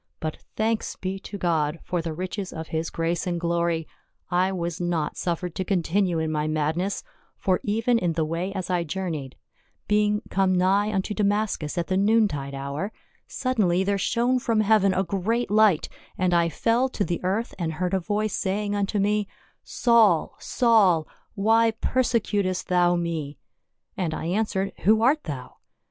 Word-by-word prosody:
But 155 -1 -4 0.2
thanks 220 0 -1
be 190 +1 -4
to 200 +1 -8
God 165 -3 0
for 180 -2 -2
the 165 0 -4
riches 185 +4 -4
of 160 0 -7
his 160 +1 -2
grace 165 +2 -2
and 175 -1 -1
glory, 170 -1 0 0.4
I 180 +2 +2
was 175 -2 -3
not 170 -3 -1
suffered 175 0 -2
to 190 - -2
continue 185 -1 +1
in 160 -1 -1
my 150 0 -1
madness, 155 +6 -1 0.3
for 185 -2 +1
even 225 +3 +1
in 175 -4 0
the 160 -1 0
way 170 +4 -2
as 185 -2 -4
I 175 -1 +1
journeyed 155 -5 -4 0.3
— - - -43
being 210 0 +2
come 190 -1 +2
nigh 195 +3 +2
unto 195 +1 -1
Da 210 - -1
mascus 200 -6 0
at 170 - 0
the 185 +1 0
noon 215 +2 +4
tide 140 -5 -5
hour 140 +9 -4 0.2
— - - -38
suddenly 200 -8 +1
there 200 +1 0
shone 245 +5 +1
from 230 -3 +1
heaven 210 -2 +4
a 185 +1 +1
great 200 +6 -1
light, 210 -6 +4 0.3
and 180 -1 +1
I 170 -1 +3
fell 235 - +1
to 205 -5 -1
the 175 0 -3
earth 200 +6 -1
and 165 -2 -2
heard 180 +3 -2
a 190 - +3
voice 210 +3 -1
saying 205 +2 -1
unto 205 0 -1
me, 205 +1 +1 0.2
' - - -46 0.2
Saul, 225 -9 +4
Saul, 205 - +3 0.3
why 225 +3 +4
perse 255 -1 +1
cutest 185 -3 -1
thou 175 -1 +3
me 165 -4 -3 0.3
?' - - -52
and 165 -4 -2
I - - -5
answered, 195 +1 -1
Who 220 +2 +3
art 290 +5 +3
thou 135 -5 -7
185 Hz, 185 wpm, -25 LUFS, 170-210 Hz, 0.4 s, noon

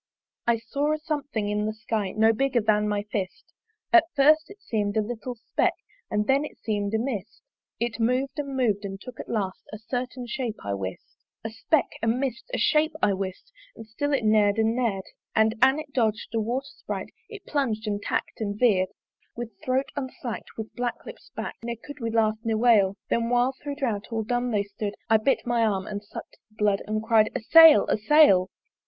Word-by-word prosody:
I 235 -1 +4
saw 280 +7 -1
a - - 0
something 290 -8 -3
in 210 +1 -1
the 215 - -3
Sky 215 -3 -2
No 220 +1 +4
bigger 265 +1 +1
than 210 0 +2
my 205 -1 -1
fist; 200 - -4 0.4
At 350 -2 +8
first 305 +3 +5
it 405 +1 -13
seem'd 215 - -2
a - - +4
little 240 +3 -5
speck 235 - 0 0.3
And 210 0 0
then 270 +4 +3
it 300 - -8
seem'd 205 -1 -2
a - - +3
mist: 220 -4 -4 0.4
It 235 0 -2
mov'd 260 +5 0
and 280 -2 -3
mov'd, 215 -5 +1
and 195 -1 -6
took 250 +3 -11
at - - -7
last 195 -5 -2
A 215 - -6
certain 245 +3 -4
shape, 240 -2 -3
I 100 - -1
wist. 95 -1 -6 0.3
A 225 - -4
speck, 285 +7 +1 0.2
a 230 - -1
mist, 250 - -1
a - - -1
shape, 310 0 +2
I 200 - +4
wist! 190 - -5 0.2
And 225 - -10
still 260 +7 -3
it 270 -5 +1
ner'd 215 -1 +4
and 225 +1 +2
ner'd; 225 -6 0 0.3
And, 220 0 +4
an 265 +2 +6
it 305 -2 -7
dodg'd 220 -4 0
a 225 - +1
water 245 +5 -2
sprite, - - -6 0.2
It 410 -4 -10
plung'd 245 -7 -1
and 205 -1 -2
tack'd - - -3
and 205 -1 -2
veer'd. 200 -6 +3 0.5
With 235 -1 -5
throat 260 +1 0
unslack'd, 260 -4 -5
with 220 -1 -6
black 245 -1 -3
lips - - -11
bak'd - - -6
Ne 235 0 -4
could 285 +6 -11
we 230 -2 -2
laugh, 220 -1 +1
ne 225 -2 0
wail: 215 -4 +4 0.2
Then 230 0 +1
while 245 +2 +2
thro' 285 -1 -4
drouth 230 -8 -2
all 225 -1 -1
dumb 245 +2 -1
they 210 -3 +1
stood 205 +1 -5 0.2
I 220 - +7
bit 225 +6 +1
my 240 -1 +1
arm 195 -4 0
and 205 -1 -5
suck'd 200 - -10
the 215 - -28
blood 205 -2 +1
And 215 0 -1
cry'd, 220 -1 +4
A - - 0
sail! 325 +6 +8
a - - +1
sail! 215 -7 +5
225 Hz, 210 wpm, -26 LUFS, 210-265 Hz, 0.5 s, At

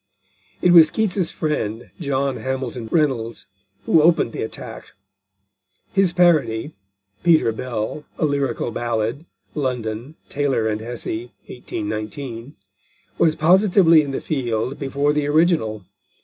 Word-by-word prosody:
It 180 - +5
was 165 -3 +8
Keats's 195 -3 0
friend, 120 -7 -3
John 140 -3 -1
Hamilton 130 -3 -4
Reynolds, 130 -8 0 0.4
who 160 - +5
opened 165 -7 +3
the - - -5
attack. 110 - -8 1.0
His 195 -3 +3
parody 155 -8 +2 0.5
(Peter 160 -9 +4
Bell: 115 +4 -4
a - - +1
Lyrical 140 -5 -1
Ballad. 120 +6 -2 0.3
London, 125 -1 -3
Taylor 135 -6 0
and 110 0 -2
Hessey, 120 0 -5
1819) 115 +3 -6 0.6
was 160 -1 +3
positively 180 -1 +5
in 145 - -5
the 135 - -3
field 125 -3 -2
before 140 +1 0
the 150 -1 0
original. 145 - +1
135 Hz, 115 wpm, -21 LUFS, 115-155 Hz, 1.0 s, was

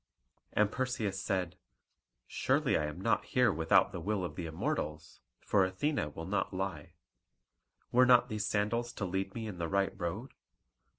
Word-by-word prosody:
And 105 0 +3
Perseus 110 -7 -2
said, 95 -3 -1 0.7
"Surely - - +1
I 75 - +1
am 75 +3 -7
not 115 +4 +1
here 125 -5 +2
without 80 +5 +4
the 90 - -5
will 100 +2 -1
of - - -6
the 85 -3 -4
Immortals, 80 -1 -3 0.2
for 100 -2 +3
Athene 95 - -1
will 80 - -5
not 100 +3 -1
lie. 95 -6 -4 1.0
Were 125 +1 +5
not 125 0 +6
these 110 -3 -2
sandals 115 +3 0
to 100 - -3
lead 95 +1 -2
me 115 -1 -4
in 100 -5 -6
the 85 - -1
right 100 0 +1
road? 95 +8 -4
100 Hz, 165 wpm, -32 LUFS, 85-110 Hz, 1.0 s, not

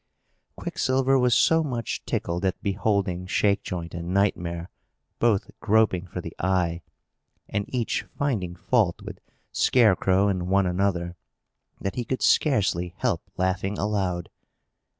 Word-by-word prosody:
Quicksilver 130 +1 +1
was 125 -2 +3
so 160 0 +4
much 120 -7 -3
tickled 85 +2 -2
at 95 -1 0
beholding 100 -3 0
Shakejoint 95 -4 0
and 85 +1 -5
Nightmare 90 -3 0 0.5
both 110 -4 +2
groping 105 -4 +2
for 90 0 -5
the 85 - -8
eye, 90 -2 0 0.7
and 100 0 -2
each 120 -3 -1 0.2
finding 105 -12 -1
fault 100 -1 +1
with - - -8 0.3
Scarecrow 100 -4 +3
and 90 -3 -1
one 95 +1 +3
another, 90 -1 -1 0.6
that 95 - -3
he 125 - -2
could 130 +3 -3
scarcely 95 - +2
help - - -1
laughing 95 +2 -1
aloud. 95 -4 -1
95 Hz, 125 wpm, -25 LUFS, 90-110 Hz, 0.7 s, so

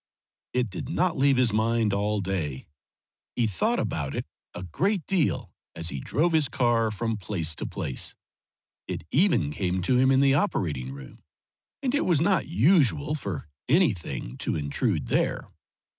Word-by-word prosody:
It 125 -4 0
did 95 - -6
not 175 +2 +1
leave 135 -1 +3
his 125 -4 +3
mind 110 -1 +2
all 105 +1 0
day; 85 -9 -3 0.7
he 120 - +2
thought 215 - 0
about 70 -4 -2
it - - -3 0.3
a 90 - -6
great 175 - -1
deal 180 -6 0 0.2
as 85 0 -3
he 70 - -4
drove 165 - +1
his 155 -5 +3
car 120 -3 +2
from 110 +1 -2
place 85 -5 -2
to - - -3
place. 65 - -3 0.7
It - - -4
even 155 - +3
came 90 +3 -1
to 125 +7 +3
him 130 +1 +4
in 135 0 +4
the 135 0 +4
operating 80 - 0
room, 70 -1 -11 0.6
and 260 -1 0
it 290 - +2
was 170 -5 +3
not 175 -1 +2
usual 145 - +3
for 100 - -4 0.2
anything 95 - +1
to - - -1
intrude 70 -1 -1
there. - - -1
115 Hz, 160 wpm, -26 LUFS, -, 0.7 s, him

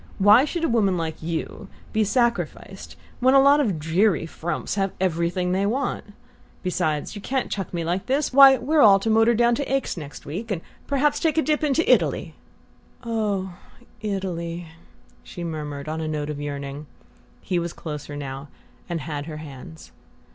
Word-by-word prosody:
Why 210 +7 +6
should 335 +2 -3
a - - +3
woman 205 -6 +2
like 160 -1 -4
you 165 +5 -4 0.3
be 220 - +3
sacrificed 235 +3 -1 0.2
when 260 +2 +4
a - - +8
lot 280 +2 +6
of 210 - +1
dreary 165 +3 +1
frumps 165 0 -4
have 195 -1 0
everything 180 0 0
they 195 +2 +1
want? 265 +6 -3 0.5
Besides, 175 -3 -1
you 205 - -7
can't 265 +4 -2
chuck 195 -4 -3
me 170 -2 -2
like 175 +3 -2
this! 275 +1 0
Why, 270 0 +9
we're 295 +5 +2
all 200 -5 +8
to 220 +3 -1
motor 225 +2 +4
down 240 +1 +3
to 270 +2 -2
Aix 270 -7 -1
next 150 -3 -9
week, 195 +10 -5
and 190 -6 -2 0.3
perhaps 290 +1 +1
take 320 -1 0
a 320 - +4
dip 305 0 0
into 300 +2 +1
Italy - - +2 0.4
" - - -32
"OH, 210 -5 -2 0.5
ITALY 175 -5 -4 0.3
" - - -31
she 175 - -8
murmured 150 -3 -5
on 160 +1 -3
a 160 - -3
note 150 -1 -3
of 145 -1 -6
yearning. 140 0 -5 0.5
He 180 -2 -1
was 170 0 -3
closer 150 -3 -7
now, 140 0 -6 0.4
and 170 -2 -2
had 145 0 -5
her 155 -2 -6
hands. 155 +2 -11
185 Hz, 180 wpm, -24 LUFS, 160-235 Hz, 0.5 s, Why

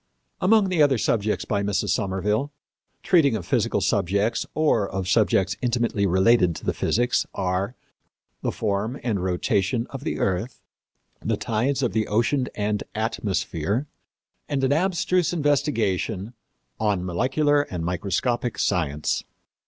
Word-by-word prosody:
Among 205 0 +4
the 175 -4 +2
other 145 -2 +5
works 110 -2 0
by 100 -1 0
Mrs. 100 0 -1
Somerville, 105 +7 0 0.5
treating 155 -10 +4
of 95 -6 -4
physical - - +1
subjects 100 +6 +1
or 145 -10 +2
of 95 -1 -3
subjects 105 -1 +2
intimately 120 -4 +1
related 95 -1 +4
to - - -2
physics 120 +2 +1
are 95 +5 -1 0.7
The - - -1
Form 110 +5 -2
and 105 -7 -1
Rotation 100 +5 0
of 135 0 -7
the - - -2
Earth, 100 +6 -1 0.6
The - - 0
Tides 130 +5 0
of 125 - 0
the 110 -1 0
Ocean 120 +5 +1
and 105 0 -1
Atmosphere, 110 - -1 0.6
and 135 -2 -1
an 135 +1 +3
abstruse 180 +1 +1
investigation 115 - 0 0.5
On 105 -4 0
Molecular 145 - +2
and 90 -11 -5
Microscopic 105 +7 -1
Science. 75 -6 0
110 Hz, 130 wpm, -24 LUFS, 95-130 Hz, 0.7 s, other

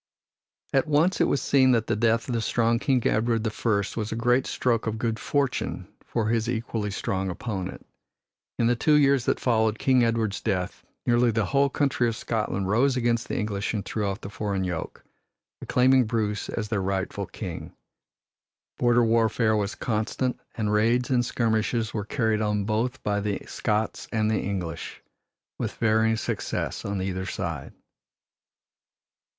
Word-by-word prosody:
At 135 +1 +3
once 155 +5 +2
it - - +4
was 140 - 0
seen 130 -2 +4
that 115 -2 +2
the 110 - 0
death 115 +1 +1
of 125 - -2
the 115 - 0
strong 115 +1 +1
King 130 -2 +1
Edward 115 0 +1
the 110 - -1
First 105 -3 -1
was 110 -1 -3
a - - -2
great 120 +3 +2
stroke 115 -3 0
of 110 0 -1
good 115 -1 -1
fortune 140 +1 -1 0.2
for 110 -2 -1
his 115 0 +1
equally 115 -3 -2
strong 95 -1 -2
opponent. 95 0 -5 0.7
In 115 - +2
the 120 +1 +3
two 150 +6 +3
years 140 -3 +4
that - - +1
followed 110 -3 +2
King 130 0 +3
Edward's 115 -3 0
death 95 -5 -2 0.2
nearly 120 0 +4
the 110 -2 +1
whole 140 0 +2
country 135 -3 +1
of 115 - -1
Scotland 105 -4 -2
rose 125 +6 +2
against 120 -1 +1
the - - -3
English 105 0 -2
and 100 - -3
threw 110 - -2
off 100 +1 -3
the 95 - -7
foreign 100 -3 -2
yoke, 90 -3 -4 0.6
acclaiming 130 0 +4
Bruce 110 -2 -1
as 105 -2 -3
their 105 -3 0
rightful 95 0 -2
king. - - -7 1.1
Border 120 -1 +4
warfare 115 -1 +2
was 105 -1 -1
constant 120 +3 -1 0.2
and 105 -2 -1
raids 120 +4 +2
and 125 -1 +3
skirmishes 115 -1 0
were 105 -2 -2
carried 110 -2 0
on 105 -1 0
both 115 +4 -1
by 105 -1 0
the 100 -1 -2
Scots 110 -1 -2
and 110 -1 +1
the 110 - +1
English, 90 -5 -5 0.6
with - - -3
varying 110 0 +2
success - - -3
on 100 -2 -2
either 95 0 -3
side. 85 -8 -4
110 Hz, 165 wpm, -26 LUFS, 105-120 Hz, 1.1 s, it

